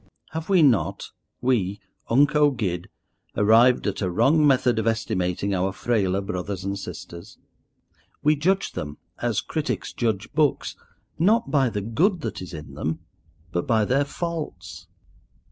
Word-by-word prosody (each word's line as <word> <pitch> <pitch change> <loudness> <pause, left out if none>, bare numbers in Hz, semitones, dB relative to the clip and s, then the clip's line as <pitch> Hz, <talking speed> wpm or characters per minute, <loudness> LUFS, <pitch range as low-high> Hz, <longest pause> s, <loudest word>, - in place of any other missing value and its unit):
Have 160 +2 -5
we 185 -4 +5
not—we 115 -5 0 0.3
unco 145 +4 +4
guid—arrived 105 +2 +1
at 100 -1 -2
a 95 - 0
wrong 140 - +4
method 125 -4 +3
of 110 - -1
estimating 100 -4 -1
our 95 +1 0
frailer 100 -2 0
brothers 95 0 -4
and 100 +1 -3
sisters? 85 +1 -9 0.9
We 150 +1 +4
judge 185 +7 +1
them, 75 0 -6 0.2
as - - 0
critics - - -3
judge 110 -2 -2
books, 150 -1 +1 0.4
not 220 +7 +3
by 135 -4 +3
the 105 -2 -3
good 160 - +1
that - - -4
is 90 - -8
in 75 -2 -9
them, 80 +2 -3 0.5
but 90 - -2
by 110 -2 +3
their 135 +6 +2
faults. 95 - -6
110 Hz, 135 wpm, -24 LUFS, 95-145 Hz, 0.9 s, we